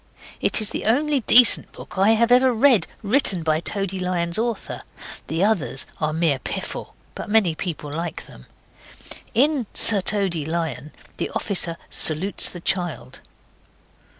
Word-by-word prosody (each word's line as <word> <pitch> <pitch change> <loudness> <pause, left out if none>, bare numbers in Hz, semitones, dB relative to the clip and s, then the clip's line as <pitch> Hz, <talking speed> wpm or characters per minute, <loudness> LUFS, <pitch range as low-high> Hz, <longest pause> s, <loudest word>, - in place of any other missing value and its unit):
It - - +2
is 215 - +1
the - - -5
only 285 +5 +1
decent 240 -1 +7
book - - -12
I 200 +3 +3
have 235 +2 +1
ever 255 +1 +4
read 245 -1 +2 0.2
written 200 - +2
by 155 -1 0
Toady 195 +1 -3
Lion's 175 0 -2
author. 235 -1 -4 0.5
The 165 +3 -2
others 200 -10 0
are 155 -1 -1
mere 155 -4 0
piffle. - - -7 0.2
But - - -8
many 210 -6 +2
people 155 -3 -6
like 165 0 -6
them. 60 - -16 0.9
In 270 -1 +1
Sir 205 -3 +4
Toady 190 -5 -1
Lion 155 -3 -5 0.3
the - - -3
officer 175 -4 -2
salutes 165 +6 0
the 175 - -10
child. 175 -9 -4
190 Hz, 145 wpm, -21 LUFS, 165-225 Hz, 0.9 s, decent